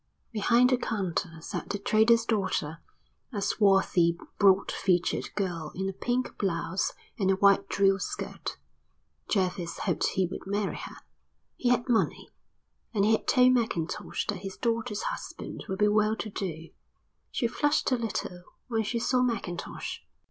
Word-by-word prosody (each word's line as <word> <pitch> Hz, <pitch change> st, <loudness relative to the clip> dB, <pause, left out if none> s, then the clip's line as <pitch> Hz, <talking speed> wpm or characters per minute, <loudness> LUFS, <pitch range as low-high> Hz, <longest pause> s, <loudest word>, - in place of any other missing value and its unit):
Behind 235 Hz, +3 st, +4 dB
the 255 Hz, -, +4 dB
counter 180 Hz, -7 st, -2 dB
sat -, -, -5 dB
the 205 Hz, -, -1 dB
trader's 220 Hz, +3 st, +4 dB
daughter, 190 Hz, -8 st, -1 dB, 0.5 s
a 210 Hz, -, -3 dB
swarthy 195 Hz, -4 st, +3 dB, 0.2 s
broad 195 Hz, -1 st, +5 dB
featured 180 Hz, -2 st, +1 dB
girl 170 Hz, -6 st, -2 dB
in 190 Hz, +1 st, -2 dB
a 195 Hz, -, -2 dB
pink 245 Hz, +6 st, -2 dB
blouse 175 Hz, -1 st, -1 dB, 0.3 s
and 190 Hz, -2 st, +2 dB
a 195 Hz, -, +4 dB
white 200 Hz, 0 st, +4 dB
drill 195 Hz, 0 st, +3 dB
skirt. -, -, -5 dB, 0.7 s
Jervis 185 Hz, -3 st, 0 dB
hoped -, -, +1 dB
he 190 Hz, -, +1 dB
would 180 Hz, -, -7 dB
marry 200 Hz, 0 st, -1 dB
her. -, -, -8 dB, 0.6 s
He 245 Hz, -, 0 dB
had 245 Hz, 0 st, +2 dB
money, 235 Hz, -3 st, 0 dB, 0.6 s
and 200 Hz, -1 st, +3 dB
he 215 Hz, -, +4 dB
had 220 Hz, -, +1 dB
told 255 Hz, 0 st, +6 dB
Mackintosh 220 Hz, -9 st, -1 dB
that 205 Hz, -3 st, -2 dB
his 195 Hz, 0 st, -7 dB
daughter's 230 Hz, -3 st, -1 dB
husband -, -, -5 dB
would 190 Hz, -, -2 dB
be 210 Hz, +1 st, +4 dB
well 215 Hz, +1 st, +3 dB
to 215 Hz, -1 st, -5 dB
do. 165 Hz, -5 st, -5 dB, 0.6 s
She -, -, -1 dB
flushed 290 Hz, +5 st, +1 dB
a -, -, +5 dB
little 220 Hz, -6 st, -3 dB, 0.3 s
when 225 Hz, -2 st, +1 dB
she 220 Hz, +2 st, -2 dB
saw 250 Hz, +2 st, +2 dB
Mackintosh. 230 Hz, -8 st, -3 dB
200 Hz, 155 wpm, -28 LUFS, 185-230 Hz, 0.7 s, told